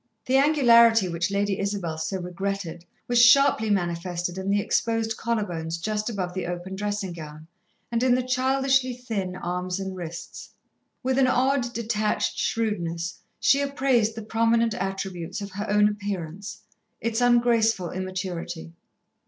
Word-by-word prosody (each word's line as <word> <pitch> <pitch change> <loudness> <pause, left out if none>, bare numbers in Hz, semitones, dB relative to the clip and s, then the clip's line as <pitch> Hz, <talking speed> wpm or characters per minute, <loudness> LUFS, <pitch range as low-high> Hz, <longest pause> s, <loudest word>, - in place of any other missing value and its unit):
The 260 +1 +3
angularity 235 -7 +5
which 170 0 -1
Lady 200 0 0
Isabel 195 -6 -2
so 190 +4 -2
regretted 180 -1 -4 0.2
was 240 -1 +4
sharply 250 -3 +5
manifested 175 -2 -1
in 190 +1 -3
the 205 +1 +3
exposed 225 +1 0
collar 230 -2 -1
bones 165 -2 -4
just 210 +5 -2
above 185 -5 -3
the 185 -2 -3
open 175 +2 -5
dressing 205 -2 -3
gown, 155 -2 -9 0.5
and 235 0 0
in 255 -1 +4
the 255 - 0
childishly 260 0 +1
thin 210 -7 -4
arms 180 +1 -3
and 190 -1 -4
wrists. 170 -2 -8 0.5
With 260 +1 +1
an 260 - +5
odd, 255 -1 +2
detached 215 -2 -1
shrewdness, 175 -6 -2 0.2
she 280 - +4
appraised 265 -6 +1
the 225 - -6
prominent 230 +1 +2
attributes 190 -3 -4
of 200 -1 -6
her 205 +3 -5
own 210 0 +5
appearance, 200 -2 -5 0.4
its 230 +1 -1
ungraceful 235 -6 +3
immaturity. 180 -3 -5
205 Hz, 145 wpm, -25 LUFS, 180-235 Hz, 0.5 s, angularity